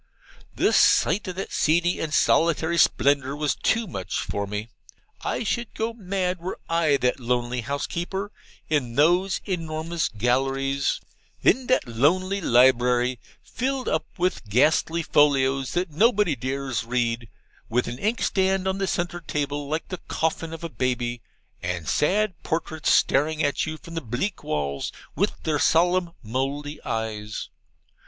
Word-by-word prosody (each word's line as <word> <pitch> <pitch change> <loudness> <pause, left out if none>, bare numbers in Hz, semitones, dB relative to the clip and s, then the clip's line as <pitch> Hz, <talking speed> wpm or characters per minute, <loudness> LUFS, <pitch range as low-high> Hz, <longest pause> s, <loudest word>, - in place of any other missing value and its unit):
The - - +2
sight 200 - +4
of 180 - -4
that 195 - -5
seedy 175 +2 +2
and 160 - -3
solitary 165 +2 +3
splendour 140 -2 +3
was 150 0 0
too 230 0 +1
much 95 - -4
for 100 0 -3
me. 105 +2 -4 0.5
I - - -1
should 235 +2 -2
go 225 +1 -2
mad 185 -4 -2
were 180 +3 -5
I 165 -4 +3
that 125 0 0
lonely 120 0 -1
housekeeper 175 - -3 0.4
in 130 -6 0
those 175 +7 +3
enormous 165 -2 -2
galleries 135 +4 0 0.4
in 255 +2 +3
that 255 - +2
lonely 185 - +1
library, 125 -2 +4 0.2
filled 260 +1 -2
up 160 - 0
with 175 - -1
ghastly 155 +8 +3
folios 135 -3 +3
that 175 -1 -1
nobody 210 - +3
dares 130 0 -2
read, 115 -1 -1 0.4
with 120 +2 +1
an 120 +2 -5
inkstand 195 -3 +1
on 190 0 -1
the 195 - 0
centre 175 -1 -2
table 145 -2 -3
like 155 +3 -3
the 185 - -6
coffin 160 0 -1
of 165 0 -8
a - - -2
baby, 120 -4 -2 0.4
and 85 -3 -3
sad 195 +4 +1
portraits 160 -1 -2
staring 155 +2 +3
at 145 +1 0
you 155 0 -4
from 170 +1 -12
the 165 - -3
bleak 130 - -3
walls 70 -2 -2 0.2
with - - -1
their 150 -2 0
solemn 175 +2 +3
Mouldy 140 +6 -3
eyes. 110 -1 -4
150 Hz, 145 wpm, -25 LUFS, 125-180 Hz, 0.5 s, sight